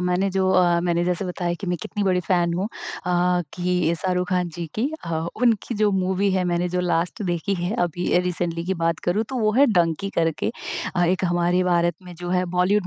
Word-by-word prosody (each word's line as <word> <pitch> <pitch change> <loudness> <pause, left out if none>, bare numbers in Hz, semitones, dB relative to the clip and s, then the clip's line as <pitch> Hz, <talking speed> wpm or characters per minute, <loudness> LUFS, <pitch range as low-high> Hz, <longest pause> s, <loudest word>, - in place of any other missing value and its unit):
मैंने 180 +2 +1
जो 190 0 +1
अ, 175 -2 +4
मैंने 175 -1 +1
जैसे 180 +2 -1
बताया 175 -1 -2
कि 200 - -5
मैं 180 0 0
कितनी 205 -1 -3
बड़ी 185 -2 +2
फैन 175 -1 +1
हूँ 185 +3 -1 0.4
अ, 180 0 +2
कि 180 -2 +1
शाहरुख 180 -1 0
खान 180 -1 0
जी 170 0 -4
की। 235 +6 0 0.2
अ, 170 - -5 0.3
उनकी 235 0 +2
जो 210 0 +2
मूवी 190 +1 +1
है 185 -1 +1
मैंने 175 0 0
जो 180 +1 -1
लास्ट 175 +2 -1
देखी 175 +3 -1
है 180 +4 -2
अभी 175 +1 +1
रिसेंटली 175 -2 -2
की 190 +1 -1
बात 165 -1 0
करूँ 185 +5 +1
तो 265 - -4
वो 215 -2 +2
है 275 +5 +5
डंकी 175 - +1
करके। 165 -2 +1 0.5
अ, 175 - +3
एक 185 +2 +1
हमारे 175 +1 +2
भारत 175 -1 +2
में 180 -1 -10
जो 175 +1 -6
है 180 0 +2
बॉलीवुड 185 +1 +2
180 Hz, 215 wpm, -23 LUFS, 175-190 Hz, 0.5 s, है